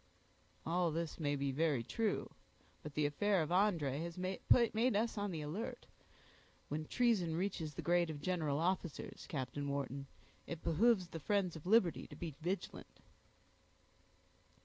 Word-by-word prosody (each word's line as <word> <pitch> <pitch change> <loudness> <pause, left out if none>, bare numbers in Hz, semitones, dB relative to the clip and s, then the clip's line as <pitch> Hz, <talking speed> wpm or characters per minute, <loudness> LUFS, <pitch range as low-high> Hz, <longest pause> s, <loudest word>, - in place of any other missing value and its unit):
"All 175 +1 +2
this 165 +1 -3
may 145 -2 +1
be 140 -1 -1
very 145 -3 +1
true; 220 - -1 0.5
but 150 -1 -8
the 150 - +2
affair 185 +5 +2
of 155 - -4
André 170 -8 +2
has 170 +1 -5
made 185 +1 -3 0.5
us 225 +3 +1
on 205 -1 -1
the 165 -4 -3
alert. 165 +10 -4 0.8
When 155 +1 -2
treason 200 -7 +2
reaches 170 -5 -2
the - - -5
grade 175 -1 +3
of 150 -2 -5
general 155 -3 0
officers, 175 -1 -2
Captain 140 0 -3
Wharton, 140 0 -3 0.4
it 165 -1 -6
behooves 185 +3 +3
the 165 - -6
friends 190 +1 +1
of 160 +2 -8
liberty 195 -5 +4
to 145 - -10
be 160 0 -5
vigilant." 185 +5 -4
165 Hz, 150 wpm, -37 LUFS, 150-185 Hz, 0.8 s, liberty